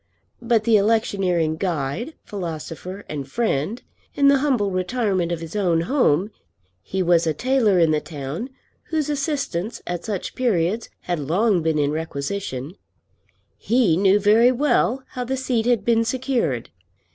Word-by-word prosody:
But 230 -2 +2
the 225 -1 +5
electioneering 195 -7 +1
guide, 175 - -2
philosopher, 180 0 -6
and 140 -3 -5
friend, 220 - -1 0.4
in 280 0 +5
the 280 -1 +4
humble 250 -9 +1
retirement 185 -2 0
of 170 -1 -3
his 165 +2 -8
own 175 -5 +2
home, 195 - +2 0.5
he 190 - -2
was 170 -1 +3
a 155 - 0
tailor 245 - +2
in 165 -2 +4
the 155 -1 +1
town, 150 - -6 0.4
whose 310 -2 -1
assistance 275 - -2
at 175 -1 -4
such 205 -4 -4
periods 220 -3 0
had 175 -2 -2
long 180 +6 +1
been 160 -1 0
in 145 -1 +1
requisition, 155 -1 -4 0.8
he 230 -8 +2
knew 195 +3 +4
very 220 +4 +5
well 265 -1 +1
how 250 - -4
the 265 +2 -2
seat 245 -3 0
had 235 -5 +2
been 230 -1 +3
secured. 235 - -1
200 Hz, 145 wpm, -22 LUFS, 165-240 Hz, 0.8 s, the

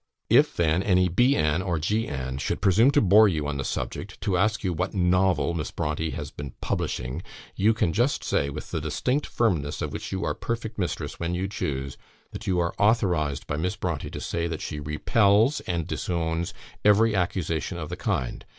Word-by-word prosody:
If - - +5
then 85 +1 +2
any 90 -2 +3
B 120 +10 +3
an, 75 +3 +1
or 90 -3 -1
G 105 +9 0
an, 65 -1 -4
should - - -2
presume 105 +7 +5
to 140 - +4
bore 105 +2 +7
you 80 -6 -1
on 70 -1 -2
the 70 - -2
subject, - - -4
to 95 - 0
ask 105 +4 +1
you 90 -3 0
what 90 +5 -2
'novel' 90 -1 +2
Miss 75 -5 -3
Brontë 80 -1 -2
has - - -5
been 70 -3 -8
'publishing,' 65 +7 -2 0.3
you 105 +4 +4
can 85 -7 +1
just 120 +6 +1
say, 70 - 0
with 70 +2 -7
the 80 - -2
distinct 125 - -1
firmness 80 -11 0
of - - -3
which - - -5
you 95 - -2
are - - 0
perfect 115 -2 -4
mistress 90 - -3
when 85 +1 -1
you 95 +2 -1
choose, 70 -8 -4 0.3
that 110 - -8
you 95 -2 +1
are 85 0 0
authorised 90 -10 +2
by 75 - -3
Miss 90 +4 -2
Brontë - - -3
to - - -4
say, 85 0 -2
that 80 -2 -4
she 75 - -4
repels 100 - +3
and 85 -3 -1
disowns 85 0 -2 0.3
every 105 +2 +5
accusation 90 -2 -1
of 80 -3 -5
the - - -4
kind. 65 - -2
90 Hz, 200 wpm, -26 LUFS, 75-105 Hz, 0.3 s, bore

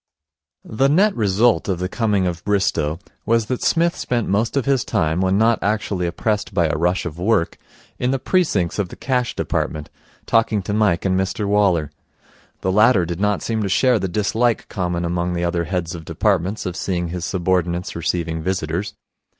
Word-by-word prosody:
The 135 +5 +1
net 195 +8 +3
result 110 +2 +2
of 95 - 0
the 90 +1 -2
coming 105 -2 0
of 85 -1 -3
Bristow 95 -6 0 0.3
was 115 -1 +2
that 125 +2 -3
Psmith 170 +1 +2
spent 120 -3 -2
most 110 +7 0
of 135 - 0
his 135 -3 +2
time, 80 +2 0
when 95 +1 +2
not 115 +2 +3
actually 100 -4 -1
oppressed 105 +3 -2
by 85 -3 +3
a 80 - -1
rush 90 +4 0
of 85 -1 -6
work, 95 -2 +1 0.4
in 125 - 0
the 135 - +1
precincts 130 - 0
of 95 -3 -1
the - - -9
Cash 125 -3 -1
Department, 75 -1 -2 0.3
talking 110 -3 +2
to 105 - -3
Mike 105 -5 +2
and 95 -1 +2
Mr 95 +2 -2
Waller. 95 -7 +2 0.7
The 95 - 0
latter 105 -2 +4
did 85 +1 -4
not 105 -1 0
seem 110 -1 -1
to 100 - -1
share 125 +5 +3
the 95 - -1
dislike 110 +5 0
common 90 -2 -2
among 85 +1 -1
the 85 0 -2
other 85 0 0
heads 85 0 -3
of 85 -2 -7
departments 95 +4 0
of 90 -2 -3
seeing 90 -3 -2
his 90 0 -5
subordinates 90 -1 -1
receiving 85 -1 -2
visitors. 95 +4 -2
95 Hz, 185 wpm, -21 LUFS, 85-110 Hz, 0.7 s, latter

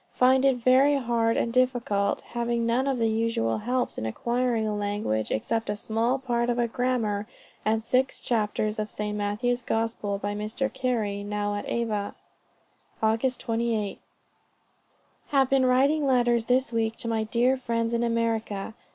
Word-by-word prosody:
Find 260 +1 +4
it 270 -2 +4
very 260 +4 +4
hard 235 -3 +1
and 230 - 0
difficult, 245 -6 +1
having 235 0 -2
none 245 +4 +1
of 270 -2 +1
the 230 -1 +2
usual 220 - 0
helps 250 +1 -1
in 110 - -3
acquiring 235 - 0
a 210 -1 -1
language, 205 - -1
except 225 - -1
a 205 - 0
small 225 +5 0
part 240 -2 -1
of 240 - 0
a 240 -1 +2
grammar, 225 -4 -1 0.4
and 220 +1 0
six 255 +2 +1
chapters 215 -2 -1
of 215 0 -2
St. 210 0 -3
Matthew's 210 +4 -1
Gospel 225 -3 -1
by 205 +1 -3
Mr. 215 +6 -3
Carey, 225 -6 -1
now 205 0 -2
at 205 - -4
Ava." 215 -4 -2 0.9
"Aug. 225 +4 +1
28. 225 -3 -2 1.3
Have 270 -2 +2
been 265 -1 +4
writing 275 +4 +3
letters 240 -3 +3
this 255 0 +1
week 225 -1 0
to - - -5
my 225 -1 0
dear 240 +4 +2
friends 230 -2 -2
in 235 - +1
America. 225 -3 -1
230 Hz, 160 wpm, -26 LUFS, 210-250 Hz, 1.3 s, Find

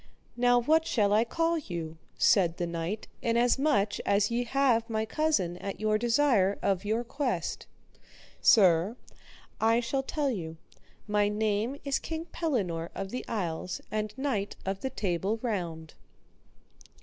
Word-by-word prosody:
Now, 245 0 +4
what 320 +6 +2
shall 205 -3 +2
I 215 +2 +5
call 330 +7 0
you? 165 - -6 0.2
said 175 -6 +3
the 175 - -1
knight, 170 +5 -4
inasmuch 235 -2 +2
as 200 +2 +1
ye 240 +1 0
have 240 -3 +2
my 220 -1 -1
cousin 220 - 0
at 195 +1 -6
your 215 0 +1
desire 230 -5 +3
of 195 -1 +1
your 220 +3 0
quest. 245 - -3 0.7
Sir, 190 0 +5 0.6
I 225 +1 +3
shall 255 +3 -1
tell 280 +1 -1
you, 165 -7 -5 0.5
my 210 -1 +2
name 215 +4 -1
is 280 -1 +1
King 325 0 -5
Pellinore 200 - -2
of 195 0 -5
the 250 - -4
Isles 180 -4 -3
and 215 0 -2
knight 255 -8 -2
of 195 0 -2
the 265 - -2
Table 200 -2 -1
Round. 170 -8 -3
215 Hz, 140 wpm, -29 LUFS, 190-245 Hz, 0.7 s, I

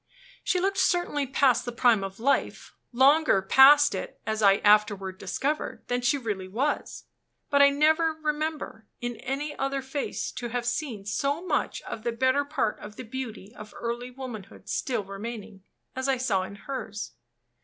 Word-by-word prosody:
She 365 - +1
looked 390 +1 0
certainly 350 -7 +1
past 265 -2 +3
the 245 - -4
prime 235 -3 +3
of 195 +1 -7
life; 275 +5 0 0.2
longer 270 -1 +5
past 285 +7 +7
it, 190 - -6
as 220 0 -2
I 200 -2 +6
afterward 205 -2 +2
discovered, 275 +10 -3
than 245 0 0
she 245 +4 +2
really 210 -7 -4
was. 260 +10 -2 0.5
But 285 0 +5
I 280 - +8
never 315 +3 +3
remember, 310 -6 -3
in 240 -1 -4
any 285 +3 -4
other 275 0 -1
face, 270 +1 -3
to 240 - -5
have 245 0 -3
seen 240 -4 -3
so 280 - -1
much - - -1
of - - -6
the 235 +1 -1
better 260 +4 +2
part 285 -7 -2
of 210 0 -10
the - - -7
beauty 225 -4 -7
of 215 -2 -11
early 240 +1 -4
womanhood 245 -6 -9
still 240 -6 -1
remaining, 205 0 -8 0.3
as 260 +1 -2
I 270 -1 +2
saw 225 -7 +1
in 190 +2 -7
hers. 210 -2 -6
250 Hz, 165 wpm, -27 LUFS, 215-280 Hz, 0.5 s, I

